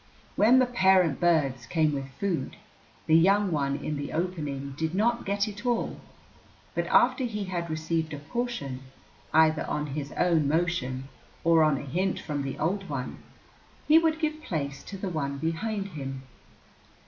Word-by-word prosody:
When 235 +5 +6
the 255 - +5
parent 190 - +3
birds 145 -8 +2
came 155 -3 +2
with 135 -1 -4
food, 175 -9 -2 0.5
the 160 - +4
young 195 +3 +4
one 140 -3 0
in 150 +1 -3
the 145 0 -5
opening 150 -5 -3
did 160 +3 -2
not 235 +3 +1
get 200 +1 +1
it 205 +1 -7
all, 240 -2 -1 0.7
but - - -1
after 265 - +4
he 210 -4 -2
had 175 -3 -3
received 160 0 -1
a 145 - -4
portion, 145 - -4 0.5
either 160 0 +4
on 150 0 -1
his 145 -1 -4
own 165 -5 +2
motion 140 -5 -1 0.4
or 165 -1 +5
on 155 -3 +3
a - - -5
hint 180 +7 -1
from 145 -2 -3
the 135 -1 -4
old 190 +3 -1
one, 130 -3 -4 0.7
he 310 +2 +7
would 320 -1 +1
give 310 -1 -1
place 140 - -3
to 195 - -7
the 195 - -4
one 140 -5 -2
behind 195 +7 -2
him. 135 -5 -6
165 Hz, 165 wpm, -27 LUFS, 145-200 Hz, 0.7 s, he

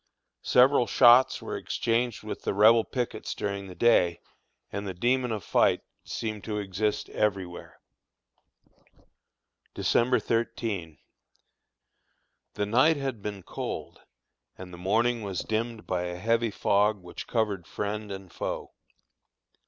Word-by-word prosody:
Several 125 0 +4
shots 125 +1 +6
were - - -4
exchanged 120 -1 -1
with 110 - -6
the - - -2
Rebel 110 +3 +6
pickets 120 -3 -4
during 100 -1 -3
the 90 - -10
day, 90 -7 +3 0.5
and 100 0 -4
the 95 - -5
demon 125 +5 +1
of 105 -4 -3
fight - - +3 0.2
seemed 110 -2 -4
to 105 -2 -3
exist 105 +1 -2
everywhere. 95 -4 -3 2.0
December 125 +2 +2
13. 105 - -2 1.6
The 105 - 0
night 130 +9 +4
had 135 -6 -4
been 100 -2 -6
cold, - - -6 0.6
and 90 -1 -10
the - - -8
morning 115 +6 +1
was 100 -4 -3
dimmed 110 0 -3
by 90 -1 -1
a 90 0 -5
heavy 115 +4 +1
fog 105 +1 +2
which 90 - -8
covered 105 -6 -1
friend 105 0 -4
and 95 -3 -8
foe. - - -4
105 Hz, 125 wpm, -27 LUFS, 95-115 Hz, 2.0 s, shots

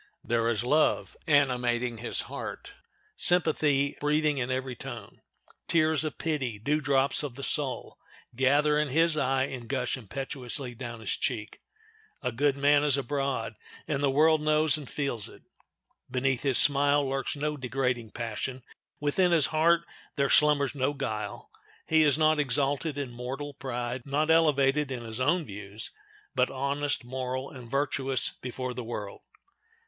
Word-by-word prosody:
There 115 0 +1
is 115 -1 0
love 150 +5 +2
animating 125 -5 +2
his 120 - -1
heart, - - -7 0.4
sympathy 150 -5 +4
breathing 150 -1 +1
in 125 0 -2
every 130 0 -2
tone. - - -9 0.5
Tears 155 -2 +2
of 155 - -4
pity—dew 145 -2 -1
drops 135 -1 +2
of 145 -5 -5
the 140 - -8
soul—gather 145 +1 0
in 150 - +1
his 165 +4 +3
eye, 135 -2 +1
and 125 -4 -6
gush 125 -3 -1
impetuously 130 +2 -4
down 120 -1 -7
his 105 - -3
cheek. 115 -6 -3 0.6
A 125 - 0
good 140 +3 +1
man 145 +1 +4
is 145 -2 +3
abroad, 135 -3 -2 0.3
and 145 -3 -1
the 140 - +3
world 155 +3 +4
knows 155 0 +3
and 150 -4 -5
feels 135 -7 -2
it. - - -16 0.7
Beneath 130 0 0
his 135 -3 +2
smile 145 0 +4
lurks 135 +1 -2
no 150 +1 -2
degrading 125 -3 -2
passion; 120 +3 -4 0.4
within 175 +5 +2
his 165 -4 +4
heart 165 +2 +4 0.3
there 140 -1 +1
slumbers 145 -2 +4
no 140 0 0
guile. 110 -7 -5 0.3
He 160 0 +4
is 145 -2 +4
not 155 -1 +3
exalted 145 +1 0
in 140 -3 -4
mortal 130 +4 -6
pride, 125 -1 -4
not 150 +3 +1
elevated 150 -3 +3
in 125 -3 -5
his 110 0 -6
own 155 +6 +2
views, 100 0 -7 0.4
but 125 0 +2
honest, 140 +1 -1
moral, 130 +1 -4
and 125 -3 -11
virtuous 135 -1 0
before 125 0 -4
the 125 0 -5
world. 105 -3 -6
135 Hz, 150 wpm, -28 LUFS, 125-150 Hz, 0.7 s, sympathy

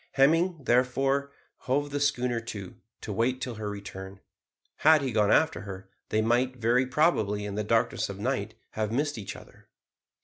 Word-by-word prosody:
Hemming, 165 +6 +3
therefore, 135 +3 +2 0.4
hove 145 +2 +1
the 145 - -1
schooner 125 -4 +1
to, 105 -5 -7 0.3
to 105 - -5
wait 125 +5 +1
till 125 -2 -4
her 110 -1 -5
return. 95 -1 -8 0.6
Had 155 -1 +5
he 130 - -1
gone 105 -2 +3
after 160 0 +3
her 95 -1 -9 0.2
they 110 0 +1
might 125 +3 +2
very 125 +2 +2
probably, 110 -9 +1
in 100 - -4
the 105 +1 -2
darkness 115 +1 +1
of 100 - -6
night, 125 +3 -2 0.2
have 110 -1 -2
missed 145 0 -1
each 100 - -6
other. - - -15
120 Hz, 170 wpm, -28 LUFS, 105-135 Hz, 0.6 s, Had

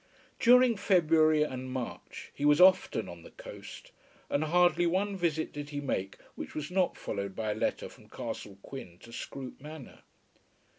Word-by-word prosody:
During 250 -1 +6
February 160 -5 +4
and 130 -3 -5
March 130 -2 -6
he - - -6
was 145 0 +5
often 185 +1 +5
on - - -9
the - - -13
coast, - - -11 0.4
and 145 +2 +1
hardly 175 +1 +3
one 195 +4 0
visit 165 -4 -1
did 145 0 -6
he 145 -1 -4
make 95 -9 -3 0.2
which - - -8
was 150 +2 -4
not 185 -1 +1
followed 100 -1 -4
by 110 -1 -2
a - - -2
letter 110 - -1
from - - -17
Castle 100 -1 -6
Quin 90 -11 -9
to 115 - -13
Scroope 130 +2 -7
Manor. 150 -2 -10
155 Hz, 165 wpm, -30 LUFS, 130-180 Hz, 0.4 s, During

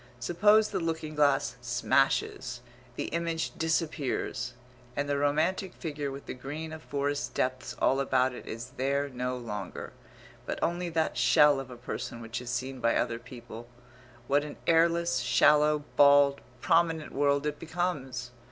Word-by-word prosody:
Suppose 210 - +4
the 195 - -1
looking 160 -2 -3
glass 140 -5 +2
smashes, 125 0 0 0.3
the - - -3
image 165 -1 -2
disappears, 150 -6 -1 0.4
and 145 0 -1
the 145 - 0
romantic 155 +7 0
figure 150 -4 -4
with 135 +1 -8
the - - -5
green 150 +5 -6
of 160 - -8
forest 145 -1 -2
depths 130 0 -2
all 135 - +2
about 130 -1 +2
it - - -10
is 115 +3 -6
there 140 +2 0
no 125 0 -3
longer, 110 -4 -6 0.5
but - - -2
only 175 +1 -1
that 160 -5 0
shell 135 +3 +5
of 135 -1 -7
a 125 - -9
person 120 0 -5
which 115 +1 -5
is 125 - -7
seen 130 +1 -3
by 115 -1 +2
other 115 -1 0
people 120 -1 -10 0.6
what 145 +3 +2
an 150 - -8
airless, 170 -3 +3
shallow, 150 +4 +4
bald, 140 -1 +6 0.2
prominent 165 -2 +2
world 140 +1 +1
it 150 0 -2
becomes! 145 -7 -3
140 Hz, 150 wpm, -29 LUFS, 125-160 Hz, 0.6 s, bald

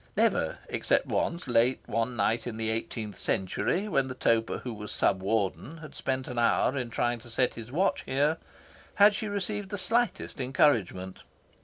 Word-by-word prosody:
Never, - - +2
except - - +1
once, 170 +1 -1
late 120 +1 +3
one 115 +2 -1
night 115 +1 +1
in 115 -2 -5
the 110 0 -1
eighteenth 110 -2 -4
century, 175 - -1
when 135 -9 +1
the 130 - -6
toper 115 -2 +1
who 125 - -6
was 105 -1 -7
Sub 95 -1 +1
Warden 110 - -1
had 155 -2 -11
spent 130 -1 -2
an 125 -1 -3
hour 120 +3 +3
in 125 -3 -2
trying 120 +1 0
to 120 - -13
set 125 +2 +1
his 115 +1 -9
watch 185 +7 +1
here, 145 +4 +1 0.6
had 205 +1 +7
she 215 - -3
received 205 0 -2
the 205 - -3
slightest 225 - 0
encouragement. 110 -8 +1
125 Hz, 175 wpm, -29 LUFS, 115-160 Hz, 0.6 s, had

